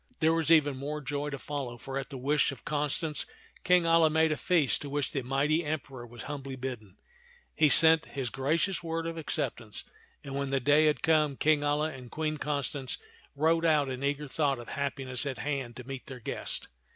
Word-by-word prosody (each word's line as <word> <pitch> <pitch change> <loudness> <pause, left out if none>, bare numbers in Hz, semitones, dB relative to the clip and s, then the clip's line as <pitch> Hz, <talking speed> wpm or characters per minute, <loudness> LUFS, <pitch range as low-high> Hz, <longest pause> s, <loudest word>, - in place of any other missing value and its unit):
There 160 0 +4
was 165 -1 +1
even 145 -4 +4
more 145 +3 -4
joy 145 0 -3
to 140 - -4
follow, 135 -4 -5
for 135 +3 -7
at 135 - -7
the 140 - -7
wish 145 +3 +2
of 135 - -11
Constance 150 +1 +1 0.4
King 180 -1 +4
Alia 165 -1 +5
made 160 0 +3
a - - +1
feast 165 -2 +2
to 145 - -6
which 145 0 -1
the 135 - -2
mighty 140 +6 +1
Emperor 135 -5 -5
was 120 0 -10
humbly 140 -2 -6
bidden. 125 -7 -7 0.6
He 155 -1 +4
sent 160 +1 +8
his 130 -4 -4
gracious 160 +8 0
word 165 -1 -3
of 165 0 -3
acceptance; 120 -8 -3 0.4
and 140 - -7
when 140 0 -2
the 135 0 +1
day 145 +4 +4
had 150 - 0
come, 155 -4 +3
King 155 -1 +3
Alia 150 +2 0
and 125 -2 -10
Queen 155 +1 -2
Constance 140 -2 -2 0.4
rode 165 +3 +2
out 150 -4 +3
in 130 +1 -5
eager 145 +1 -1
thought 140 -1 0
of 120 - -9
happiness 135 -2 -2
at 135 - -3
hand 135 -4 -3
to 125 - -8
meet 135 -2 -7
their 130 -2 -8
guest. 115 - -4
145 Hz, 200 wpm, -29 LUFS, 135-155 Hz, 0.6 s, sent